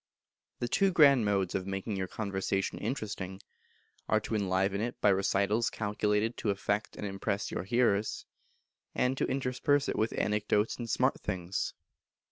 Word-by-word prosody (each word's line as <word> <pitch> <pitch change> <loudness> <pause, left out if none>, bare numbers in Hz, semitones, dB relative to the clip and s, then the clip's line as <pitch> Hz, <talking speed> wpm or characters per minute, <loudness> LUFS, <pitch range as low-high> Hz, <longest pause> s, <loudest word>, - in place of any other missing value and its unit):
The 120 - -2
Two 195 +9 +3
Grand 140 -8 +6
Modes 100 -3 +1
of 95 0 -2
making 95 +2 -3
your 95 -1 -2
conversation 95 -1 -2
interesting, 100 -5 -4 0.7
are 110 - +4
to 110 - -5
enliven 100 -1 +1
it 120 +2 -3
by 105 - +4
recitals 100 +3 +2
calculated 105 +1 0
to 105 - -2
affect 100 +2 -1
and - - -5
impress 100 +1 -2
your - - -3
hearers, 110 -2 +1 0.7
and 125 +1 +2
to - - +2
intersperse 135 +2 +1
it - - -1
with 110 +1 0
anecdotes 105 0 +1
and 120 -1 -5
smart 130 +4 +2
things. 95 -1 -3
105 Hz, 150 wpm, -31 LUFS, 95-115 Hz, 0.7 s, Grand